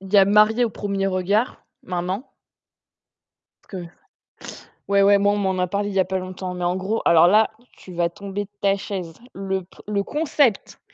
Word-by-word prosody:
il 195 +1 -11
y - - +5
a 195 - +8
Mariés 215 +4 +4
au 225 - -1
premier 195 -1 -2
regard, 195 +5 0 0.2
maintenant. 185 +6 -4 1.3
Parce 185 -3 -8
que 170 - -12 1.0
ouais, 200 0 +4
ouais, 200 0 +6
moi, 200 +1 +3
on - - 0
m'en 190 -2 -1
a 180 - +1
parlé 205 +3 -2
il 195 - -6
y 195 - +3
a - - +3
pas 190 +1 -2
longtemps 185 0 -6
mais 180 0 -4
en 180 +1 0
gros 200 +4 -2
alors 170 0 +6
là, 215 +3 +4 0.2
tu 185 - -14
vas 170 0 +1
tomber 200 +2 -5
de 200 - -19
ta 195 0 +2
chaise. 185 -4 -6 0.2
Le 190 -1 -3
p 180 - -23
le 200 -1 0
concept, 290 -5 0
195 Hz, 205 wpm, -22 LUFS, 185-205 Hz, 1.3 s, a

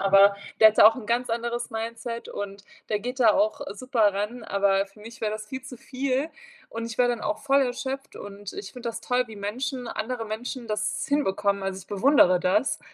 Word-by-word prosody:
Aber 195 +1 +6 0.3
der 220 - +11
hat 215 - -3
da - - +10
auch 225 - -2
'n 225 -5 -8
ganz 240 +2 0
anderes 235 +1 -2
Mindset 230 +1 -5
und 200 0 -6 0.2
der 210 - +1
geht 250 +4 -5
da 225 -3 +7
auch 315 +2 +1
super 225 -4 +2
ran, 215 +4 -3
aber 195 -1 +2
für 195 +2 -22
mich 230 +2 -11
wäre 215 -1 -1
das 215 0 -6
viel 260 +4 -6
zu 260 -1 -9
viel 270 +4 -2 0.4
und 230 0 -4
ich 230 -1 -7
wäre 245 -1 +4
dann 240 -2 -2
auch 310 - -2
voll 275 0 +3
erschöpft 265 +2 -4
und 205 0 -8
ich 400 - -7
finde 245 -2 -5
das 230 0 -5
toll, 250 0 +1
wie 220 - -10
Menschen 245 +5 -3
andere 230 +2 -3
Menschen 235 +3 -5
das 215 0 -1
hinbekommen. 200 -8 +1
Also, 195 0 -3
ich 190 - -15
bewundere 200 -4 +4
das. 210 - +1
230 Hz, 215 wpm, -26 LUFS, 205-255 Hz, 0.4 s, der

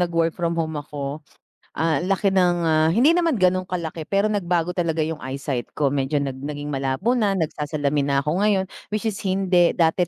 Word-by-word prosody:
nag-work 165 -2 +1
from 170 -1 -2
home 160 -2 -2
ako, 145 0 -6 0.6
ah, 160 -3 +1
ang 180 - -3
laki 195 +1 +2
ng, 180 -2 +3
ah, 155 -1 +3
hindi 240 - +4
naman 335 -4 +2
ganun 185 -2 +2
kalaki 165 -3 -4
pero 200 +3 +1
nagbago 175 -4 0
talaga 165 -3 0
yung 160 0 -4
eyesight 130 -2 -4
ko 140 -2 +1
medyo 140 +1 -1
nag 140 -2 -1
naging 145 +1 -5
malabo 135 - 0
na 210 -6 +1
nagsasalamin 150 -3 -1
na 140 - +1
ako 155 +5 0
ngayon. 200 -2 +2 0.2
Which 215 0 -3
is 220 -3 -2
hindi 185 -2 +2
dati, 170 +1 +2
165 Hz, 190 wpm, -23 LUFS, 150-190 Hz, 0.6 s, hindi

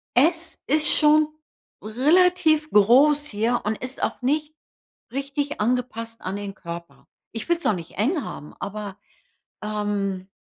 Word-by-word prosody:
Es 330 +5 +2
ist 305 +2 +4
schon 305 0 +5 0.6
relativ 310 +6 +3
groß 275 +8 +5
hier 230 +2 0
und 215 +1 -1
ist 255 +1 -6
auch - - -2
nicht 300 +4 -1 0.6
richtig 280 -1 -3
angepasst 230 -1 -2
an 185 +2 -4
den 200 -1 -6
Körper. 170 0 -9 0.2
Ich 225 - -6
will‘s 345 0 +1
auch 215 - +3
nicht 170 -1 -8
eng 280 - +1
haben, 150 - -8
aber 205 -1 -6 0.7
ähm, 205 -3 -2
250 Hz, 135 wpm, -24 LUFS, 210-300 Hz, 0.7 s, schon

